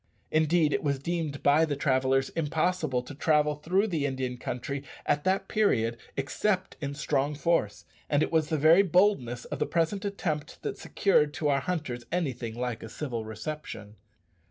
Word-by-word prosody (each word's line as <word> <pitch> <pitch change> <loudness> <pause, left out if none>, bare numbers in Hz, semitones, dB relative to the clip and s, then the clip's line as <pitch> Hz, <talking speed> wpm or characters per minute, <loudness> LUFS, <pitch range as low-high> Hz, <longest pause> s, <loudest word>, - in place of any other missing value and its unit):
Indeed, 155 0 +3
it - - +1
was 140 -2 +1
deemed 155 0 -3
by 145 +3 +5
the 150 -3 0
traders 135 -1 +2
impossible 155 -4 0
to 145 - -9
travel 150 +1 +2
through 180 +7 +1
the 160 -9 0
Indian 130 -2 -3
country 125 +3 -4 0.2
at 145 - +1
that 190 +1 +1
period 120 - +2 0.2
except 185 +8 -1
in 140 -1 -3
strong 145 0 0
force, 145 -10 0 0.2
and 145 +1 +3
it - - -2
was 160 -2 +2
the 160 - +1
very 160 +6 +6
boldness 180 - +2
of - - -5
the - - +1
present 170 +4 0
attempt 175 -7 -3
that 425 -2 -4
secured 150 -8 +2
to 150 - 0
our 140 -1 +2
hunters 145 -8 -3
anything 130 -10 -2
like 120 -2 -3
a 110 - -8
civil 120 -4 -4
reception. 110 -2 -7
150 Hz, 170 wpm, -28 LUFS, 130-170 Hz, 0.2 s, very